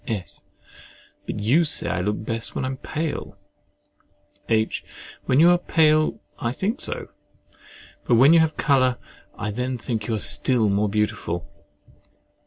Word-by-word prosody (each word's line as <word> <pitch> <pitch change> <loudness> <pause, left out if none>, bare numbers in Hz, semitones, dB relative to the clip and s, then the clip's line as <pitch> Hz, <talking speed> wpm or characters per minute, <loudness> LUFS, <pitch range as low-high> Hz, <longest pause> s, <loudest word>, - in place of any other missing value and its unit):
S. 105 -6 -5 0.9
But - - -4
you 130 +11 +3
say 155 - +2
I 90 - -1
look 105 +3 -2
best 115 0 -3
when - - -2
I - - -2
am 130 - -5
pale. 155 +3 -4 1.1
H. 110 -1 0 0.4
When 130 - +3
you 170 +2 +7
are 175 - +3
pale, 155 -3 +2 0.2
I 115 -3 -1
think 210 - -2
so; - - -4 1.0
but 120 - +3
when 135 +7 +7
you 170 - +7
have 160 -1 +2
a - - -34
colour, 130 -3 +2 0.4
I 105 - -3
then 125 +3 -3
think 110 -2 -4
you 115 -2 -1
still 115 +1 +1
more 100 +1 +1
beautiful. 105 -6 -2
125 Hz, 155 wpm, -23 LUFS, 105-150 Hz, 1.1 s, you